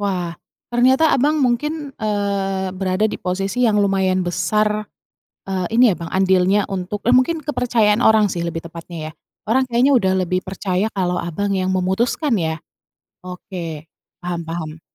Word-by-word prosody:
Wah, 180 -4 -2 0.4
ternyata 260 +6 +4
Abang 295 +2 +2
mungkin, 290 +4 -1
eee, 200 -3 -1
berada 190 +2 0
di - - -5
posisi 195 +7 -1
yang 210 -2 +3
lumayan 190 -2 +1
besar, 210 +4 0 0.6
eee, 185 -2 -1
ini 245 -1 +6
ya, - - -2
Bang, 170 - -7
andilnya 190 +1 +3
untuk 195 +2 -4
eee, 245 +2 +4
mungkin 310 +5 +2
kepercayaan 240 -6 +1
orang 215 -3 +5
sih 170 - -3
lebih 165 -1 -4
tepatnya 165 -1 -8
ya. - - -16 0.4
Orang 260 +3 +2
kayaknya 250 +3 +3
udah 190 -3 +1
lebih 185 +1 -1
percaya 190 +1 -1
kalau 180 -2 0
Abang 200 +4 -2
yang 185 0 0
memutuskan 225 - 0
ya? 160 -2 -1 0.7
Oke, 180 -4 -7 0.4
paham 175 -1 -3
paham. 160 -1 -5
195 Hz, 155 wpm, -20 LUFS, 180-230 Hz, 0.7 s, ini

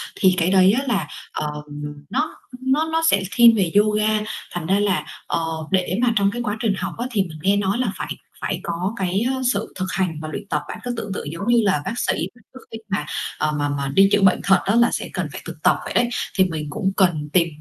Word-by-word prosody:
Thì 185 -1 +4
cái 175 +2 +2
đấy 190 0 +6
á - - -3
là, 205 -5 0 0.3
ờ, 150 - -2 0.6
nó 310 - -1 0.2
nó 285 +5 +1
nó 325 0 +1
sẽ 195 -1 +3
thiên 235 -1 +8
về 190 -6 +1
yoga, 215 +1 +3 0.3
thành 175 -3 -4
ra 195 +3 +2
là, 200 -2 +1 0.2
ờ, 165 - 0 0.3
để 185 -1 +1
mà 240 -2 +3
trong 200 -1 +3
cái 240 - -4
quá 210 -2 -2
trình 215 -3 +1
học - - -3
á 240 - -2
thì 210 -4 +2
mình 160 -4 -9
nghe 195 +4 +3
nói 200 +1 0
là 255 - 0
phải - - -4 0.3
phải - - -2
có 175 +5 -2
cái, 190 +1 0
ơ, 260 - -4
sự 200 +2 -4
thực 185 - 0
hành 180 -5 -1
và 155 - -5
luyện 155 - -6
tập. 150 - 0
Bạn - - -7
cứ 245 -1 -2
tưởng 205 -3 -4
tượng 150 - -5
giống 170 +6 -5
như 240 -1 +5
là 170 -7 +2
bác 235 - -3
sĩ - - +1 0.2
mà 240 - -20
trước 260 - -10
khi 225 - -5
mà, 200 - -1 0.3
ờ, 155 - +1
mà 145 - 0
mà 140 -1 -2
đi 195 0 +6
chữa 205 - +4
bệnh 190 -1 +5
thật 195 -1 +5
á 200 - +2
là 235 0 +5
sẽ - - -3
cần - - -2
phải - - -7
thực - - -6
tập - - +4
vậy - - -5
đấy, 240 0 +3 0.3
thì 190 - +6
mình 160 -4 -3
cũng 190 +6 -1
cần 160 -6 +2
tìm, 170 -2 +4
195 Hz, 255 wpm, -22 LUFS, 175-225 Hz, 0.6 s, thiên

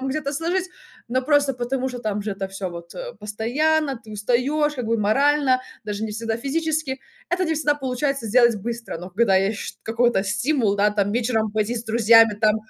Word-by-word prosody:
там 270 - -3
где-то 280 0 -2
сложить, 350 +5 -1 0.4
но 255 +2 0
просто 285 -1 +2
потому 255 +2 -2
что 250 -1 -7
там 210 -2 -2
же 210 - -3
это 195 0 -5
всё 195 -1 -5
вот, 170 0 -9
э, - - -6
постоянно, 270 +7 0
ты 215 - -12
устаёшь 255 +8 0
как 250 -4 -4
бы 230 0 +1
морально, 265 +4 +3 0.2
даже 210 0 -4
не 215 - -4
всегда 225 +1 -3
физически. 300 +1 -2 0.3
Это 370 +1 +1
не 320 - 0
всегда 295 -1 +1
получается 270 -1 -2
сделать 235 0 +4
быстро, 230 -3 -5
но 180 +2 -8
когда 195 0 +3
есть 200 +3 0
ш - - -6
какой-то 230 -3 +1
стимул, 220 +1 +1
да, 205 +1 +3
там 205 -1 0
вечером 225 -3 0
пойти 215 +2 0
с 230 - -5
друзьями, 225 -1 +5
там, 215 0 +4
235 Hz, 200 wpm, -23 LUFS, 210-280 Hz, 0.4 s, друзьями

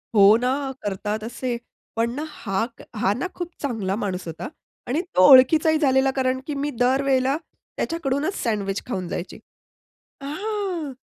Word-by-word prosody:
हो 205 +1 +8
ना, 265 +3 -1
करतात 210 +2 -3
असे. 240 +1 -3 0.4
पण 230 +1 +1
ना 290 +4 -4
हा 195 -9 -3 0.4
हा 195 - +2
ना, 255 - -3
खूप 350 -1 -4
चांगला 220 -9 -1
माणूस 195 -4 -3
होता 165 -1 -5 0.4
आणि 280 +7 0
तो 185 0 +7
ओळखीचाही 310 +5 +7
झालेला 270 -3 +3
कारण 260 -1 +1
की 300 - -2
मी 280 +1 -1
दर 255 +2 +3
वेळेला 270 +1 +2 0.4
त्याच्याकडूनच 310 +2 -1
सँडविच 200 -4 -1
खाऊन 185 -7 -3
जायची. 175 +1 -5 0.9
हां, 360 -1 -3
260 Hz, 145 wpm, -23 LUFS, 210-290 Hz, 0.9 s, हो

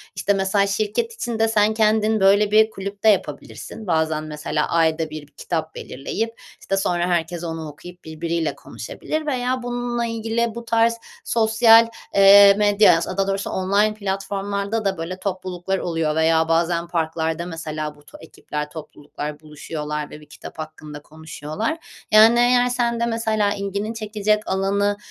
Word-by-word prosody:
İşte, 200 +2 +1
mesela 195 +1 +1
şirket 215 - -1
içinde 230 - -1
sen 215 -1 +2
kendin, 220 0 +2
böyle, 200 +2 +4
bir 220 +1 +5
kulüp 200 -1 -7
de 220 - +6
yapabilirsin. 210 +2 -3
Bazen 160 -2 0
mesela 150 0 -3
ayda 160 -1 +1
1, 155 0 -7
bir 145 - -17
kitap 160 +2 -4
belirleyip, 225 - -5 0.2
işte, 195 - -2
sonra 175 -2 0
herkes 175 -1 -1
onu 165 -1 -5
okuyup 175 +5 -13
birbiriyle 165 +1 -3
konuşabilir - - -10 0.2
veya 255 -3 -1
bununla 245 -1 -2
ilgili 230 0 -2
bu 235 0 -7
tarz 230 0 +2 0.3
sosyal, 225 0 +5 0.3
eee, 200 0 +8
medyaya, 205 -4 +5
as 165 - -3
a, 185 - -5
daha 195 0 +1
doğrusu 195 0 -2
online 200 +3 +1
platformlarda 200 +1 -3
da, 195 -1 0
böyle, 170 +3 -5
topluluklar 185 -1 -3
oluyor 165 -4 -1
veya 160 0 +3
bazen 170 +1 +1
parklarda 160 0 -2
mesela 155 -3 -5
bu 145 - -21
to - - -14
ekipler, 150 -2 -6
topluluklar 150 -1 -8
buluşuyorlar 150 0 -6
ve 150 - -11
bir - - -15
kitap 155 +1 -12
hakkında 155 -1 -8
konuşuyorlar. 155 - -5 0.3
Yani, 220 +2 +7
eğer 245 0 +4
sen 235 -1 0
de 235 - +1
mesela 220 -3 0
ilgini 200 +2 -4
çekecek 215 -1 -1
alanı 200 +1 0
195 Hz, 155 wpm, -21 LUFS, 160-220 Hz, 0.3 s, eee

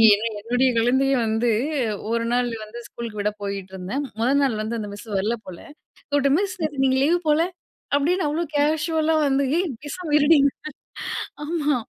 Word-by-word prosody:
எ - - -4 0.2
என்னுடைய 245 +4 +2
குழந்தையை 265 +4 +3
வந்து 225 +2 +1 0.6
1 230 0 0
நாள் 245 0 +1
வந்து 235 +3 -9
ஸ்கூலுக்கு 225 -3 -5
விட 210 +1 +1
போயிட்ருந்தேன். 195 +6 -4 0.2
1ல் 275 +4 +3
நாள் 230 -6 +1
வந்து 230 +1 -3
அந்த 205 - -5
மிஸ்ஸு 215 +1 -10
வரல 220 +5 0
போல! 180 -2 -8 0.5
கூப்புட்டு 285 0 +3
"மிஸ் 385 -2 -3
நேத்து 290 -3 0
நீங்க 260 0 +3
லீவ் 345 +3 +3
போல" 300 +2 +4 0.6
அப்டின்னு 320 +3 +1
அவ்வளோ 330 +3 -1
கேஷுவலா 315 +2 +2
வந்து, 275 0 +2
"ஏய் 365 - 0 0.2
பேசாம 310 0 -5
இருடி" 295 +1 +6 1.1
ஆமா, 300 -3 0
270 Hz, 155 wpm, -23 LUFS, 230-300 Hz, 1.1 s, இருடி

